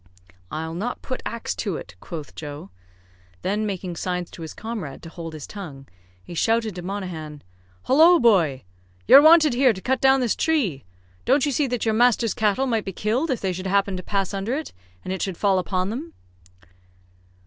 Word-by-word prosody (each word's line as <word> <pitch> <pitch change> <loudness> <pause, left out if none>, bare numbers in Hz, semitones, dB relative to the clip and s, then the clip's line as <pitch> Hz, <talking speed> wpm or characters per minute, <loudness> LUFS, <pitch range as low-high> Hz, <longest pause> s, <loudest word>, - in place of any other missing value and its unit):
"I'll 160 +1 -4
not 215 +9 -4
put 255 - -4
axe 235 0 -4
to 195 -8 -2
it," 90 - -10
quoth 155 - -8
Joe. 145 -9 -8 0.7
Then, 210 +2 0
making 185 -3 -4
signs 180 +1 -3
to - - -11
his 160 - -7
comrade 215 -11 -6
to 165 - -8
hold 165 -1 -8
his 155 -2 -7
tongue, 145 -10 -9 0.4
he 175 - -10
shouted 225 +4 +1
to 180 - -7
Monaghan, 175 -6 -6 0.4
"Hollo, 330 +6 +6
boy! 170 - +3 0.4
you're 280 - +10
wanted 315 -2 +7
here 255 -1 +4
to 190 - -8
cut 260 +6 -1
down 270 0 +5
this 245 -4 +1
tree. 220 - 0 0.4
Don't 275 - +3
you 290 - 0
see 280 +2 +1
that 245 -2 -2
your 220 - +2
master's 235 -1 +3
cattle 215 +4 +1
might 225 -5 0
be 195 - -3
killed 235 - -1
if 255 - -1
they 190 -2 -1
should 185 +2 -5
happen 200 0 +1
to 180 - -4
pass 195 +1 -2
under 200 +6 -2
it, 310 +2 -5 0.3
and 185 - -3
it 190 - -4
should 190 -4 -3
fall 195 -2 +2
upon 185 +1 -1
them." 310 +8 -6
200 Hz, 190 wpm, -23 LUFS, 175-245 Hz, 0.7 s, you're